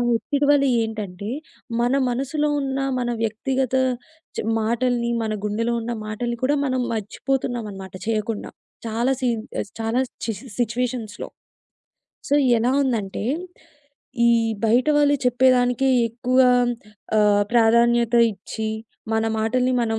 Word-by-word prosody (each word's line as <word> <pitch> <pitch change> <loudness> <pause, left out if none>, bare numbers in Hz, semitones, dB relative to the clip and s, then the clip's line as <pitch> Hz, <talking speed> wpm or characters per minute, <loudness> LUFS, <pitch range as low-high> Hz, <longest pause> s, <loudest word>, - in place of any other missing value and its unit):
ఒత్తిడి 285 +5 0
వల్ల 285 -1 +4 0.2
ఏంటంటే, 210 -3 -5 0.5
మన 245 +2 +2 0.2
మనసులో 275 +5 -1
ఉన్న, 270 -1 -2 0.2
మన 240 - -1
వ్యక్తిగత 260 +4 -1 0.6
చ్ - - -2 0.2
మాటల్ని, 235 +1 0
మన 215 -1 -2
గుండెలో 230 +3 -1
ఉన్న 235 - -3 0.2
మాటల్ని 235 +2 -3
కూడా 290 +3 +2
మనం 255 -1 0
మర్చిపోతున్నామనమాట 215 -3 -3
చేయకుండా. 220 -1 -2 0.4
చాలా 235 +4 0
సీన్ 235 -3 0 0.4
చాలా 225 +3 0 0.3
చ్ - - -4 0.3
సిట్యుయేషన్స్‌లో. 240 -2 -2 1.0
సో, 285 - +2 0.2
ఎలా‌ 240 +3 +1
ఉందంటే, 220 -8 -2 1.0
ఈ - - +6 0.3
బయట 235 +3 +3
వాళ్ళు 290 -1 +4
చెప్పేదానికే 250 +1 +3 0.2
ఎక్కువ 250 +3 -1 0.8
ఆహ్, 205 -1 +4
ప్రాధాన్యత 235 0 +4 0.2
ఇచ్చి, 215 +2 -5 0.4
మన 220 0 +2 0.2
మాటల్ని 250 +3 +1
మనం 225 -1 -1
235 Hz, 110 wpm, -22 LUFS, 220-255 Hz, 1.0 s, ఈ